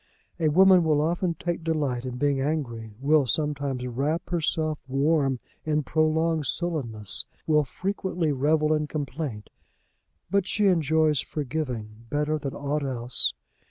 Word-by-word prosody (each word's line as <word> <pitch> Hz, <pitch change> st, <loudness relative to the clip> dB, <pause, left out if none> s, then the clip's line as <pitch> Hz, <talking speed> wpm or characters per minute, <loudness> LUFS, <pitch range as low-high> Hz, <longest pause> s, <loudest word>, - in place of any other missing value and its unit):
A 160 Hz, -, +2 dB
woman 185 Hz, +2 st, +6 dB
will 155 Hz, -2 st, +2 dB
often 170 Hz, +2 st, 0 dB
take 170 Hz, +1 st, -3 dB
delight 145 Hz, -6 st, -1 dB
in 125 Hz, -1 st, -5 dB
being 140 Hz, 0 st, +1 dB
angry; 120 Hz, -8 st, -3 dB
will 145 Hz, 0 st, +3 dB
sometimes 140 Hz, 0 st, -1 dB
wrap 140 Hz, +8 st, -2 dB
herself 155 Hz, -2 st, 0 dB
warm 135 Hz, -1 st, +1 dB, 0.2 s
in 155 Hz, -1 st, 0 dB
prolonged 155 Hz, 0 st, +1 dB
sullenness; 125 Hz, -, 0 dB, 0.2 s
will 150 Hz, -1 st, +3 dB
frequently 180 Hz, 0 st, -2 dB
revel 150 Hz, +3 st, +2 dB
in 150 Hz, -1 st, 0 dB
complaint; 145 Hz, -7 st, -5 dB, 0.8 s
but 200 Hz, -1 st, +2 dB
she 210 Hz, -, +1 dB
enjoys 160 Hz, -4 st, +3 dB
forgiving 125 Hz, -7 st, -4 dB
better 150 Hz, +2 st, 0 dB
than 140 Hz, -2 st, -5 dB
aught 145 Hz, +1 st, -2 dB
else. 125 Hz, -2 st, +1 dB
150 Hz, 130 wpm, -26 LUFS, 135-160 Hz, 0.8 s, woman